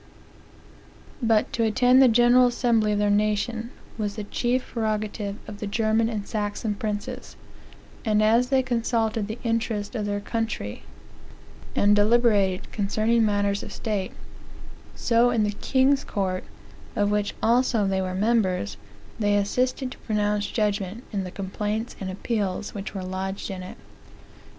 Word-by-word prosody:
"But 225 -2 +2
to 230 - +1
attend 250 +4 +5
the 265 - +8
general 245 +2 +5
assembly 230 -3 +2
of - - 0
their 205 0 +2
nation 215 +3 0 0.3
was 205 -1 -2
the 215 - -4
chief 245 +4 -1
prerogative 215 -2 -2
of 205 -1 -8
the 210 - -4
German 220 +2 +1
and 210 -3 -4
Saxon 210 0 -2
princes; 215 +5 -5 0.7
and 215 -2 +2
as 230 +3 +4
they 265 -1 +3
consulted 230 -3 0
the 220 +2 -5
interest 225 -2 -1
of 215 -4 -2
their 205 0 -1
country, 220 - -3 0.9
and 205 +1 +4
eliberated 205 -4 +3
concerning 220 +3 +1
matters 205 -1 +1
of - - -8
state, 205 -4 -3 0.8
so 235 0 +3
in 230 -3 +2
the 210 - +1
king's 265 +6 +2
court, 185 -2 -2 0.5
of 205 0 +1
which 210 -1 0
also 235 -2 +3
they 190 -1 0
were 185 0 -3
members, 190 - +1 0.4
they 205 -1 +2
assisted 250 +5 0
to - - -11
pronounce 210 -1 0
judgment 210 0 -1
in 195 -2 -1
the - - -5
complaints 210 +5 -3
and 190 - -4
appeals 200 0 -2
which 200 0 -6
were 190 - -3
lodged 190 +2 -4
in 185 -1 -5
it." 180 - -9
215 Hz, 145 wpm, -25 LUFS, 205-230 Hz, 0.9 s, the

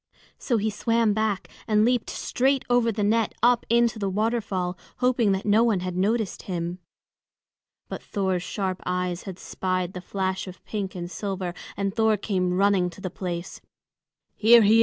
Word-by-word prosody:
So 240 - +1
he 215 +1 0
swam 230 0 +2
back 215 -2 -1 0.2
and 215 -1 +4
leaped 245 -1 +1
straight 265 +1 0
over 240 -1 +4
the 210 -1 -2
net 220 +2 +2
up 240 0 +4
into 235 -1 +3
the 200 -2 -1
waterfall, 205 -3 -1 0.2
hoping 250 -4 +2
that 190 - -2
no 215 +2 +5
one 220 -6 +2
had 180 -1 -3
noticed 210 +3 0
him. 175 -1 -4 1.1
But - - -6
Thor's 190 -3 -1
sharp 190 0 -3
eyes 180 -1 -2
had 185 - -7
spied 185 -1 -2
the 180 - -6
flash 190 0 -2
of 185 0 -11
pink 200 -3 -4
and 175 0 -5
silver, 190 -4 -3 0.2
and 195 -1 -1
Thor 220 -1 +3
came 185 -3 0
running 195 -2 +3
to 175 - -13
the 185 -2 -5
place. 175 0 -5 0.7
"He 225 +2 +6
is 235 - +8
here!" 215 +2 +6
200 Hz, 175 wpm, -25 LUFS, 185-225 Hz, 1.1 s, is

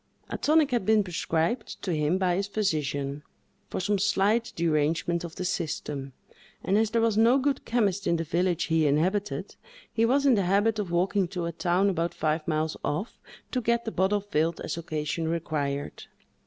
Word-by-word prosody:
A - - -2
tonic 305 -2 +3
had 240 -4 +1
been 215 +1 +4
prescribed 175 +4 -2
to 190 - -1
him 155 +3 +1
by 185 -2 +1
his 195 +2 -1
physician, 150 -8 -1 0.5
for - - -3
some 200 +2 0
slight 205 +4 +2
derangement 165 +1 +1
of 170 -2 -7
the 185 - -4
system, 150 -6 -3 0.5
and 195 - +1
as 220 0 +3
there 230 +1 +1
was 220 -2 +2
no 235 +4 +5
good 275 +1 0
chemist 205 -5 0
in 170 - +3
the 165 - -1
village 175 +2 0
he 160 -2 +2
inhabited, 185 +8 0 0.4
he 225 - +1
was 275 +3 +2
in 270 - +6
the 200 -5 +2
habit 205 +4 +2
of 200 -4 -2
walking 185 +2 +1
to 175 -1 -4
a 170 - -2
town 180 +3 +1
about 170 -3 -1
five 155 0 -1
miles 155 0 0
off, 190 +10 -3 0.3
to 255 - 0
get 235 0 +1
the 225 - -2
bottle 200 +2 +1
filled 165 -4 0
as - - -3
occasion 160 0 -3
required. 150 -4 -3
180 Hz, 185 wpm, -27 LUFS, 160-210 Hz, 0.5 s, in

